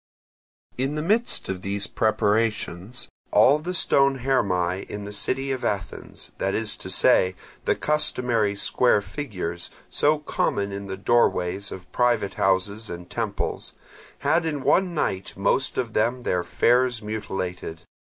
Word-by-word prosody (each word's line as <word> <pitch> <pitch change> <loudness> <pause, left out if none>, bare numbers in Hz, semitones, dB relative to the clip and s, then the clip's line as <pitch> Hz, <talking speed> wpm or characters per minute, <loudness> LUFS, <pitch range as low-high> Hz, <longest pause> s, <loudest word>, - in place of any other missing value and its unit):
In 135 +3 0
the 150 - -2
midst 220 +7 +1
of 95 -1 -4
these 100 +1 -1
preparations 110 0 0 0.2
all 145 +3 +5
the 180 +4 -4
stone 135 -5 +4
Hermae 95 -8 +1
in 105 0 -5
the 100 - -7
city 135 +6 -1
of 130 -2 -3
Athens, 100 -6 -4
that - - 0
is - - -1
to - - -7
say 95 0 +4 0.3
the - - +2
customary 120 -8 +1
square 105 +1 +3
figures, 90 - -5 0.2
so 150 +1 +3
common 100 -8 -1
in 100 0 -6
the 95 0 -5
doorways 100 -3 +1
of 90 -1 -9
private 120 -5 +1
houses 100 +3 +1
and 90 0 -8
temples, 110 -4 -3 0.5
had 160 +4 +3
in 150 -4 -2
one 180 +1 +2
night 95 -10 -2
most 130 +7 +1
of 120 -4 -2
them 120 +3 +1
their 90 -5 0
fares 120 +4 +2
mutilated. 95 -6 -4
110 Hz, 145 wpm, -24 LUFS, 95-130 Hz, 0.5 s, all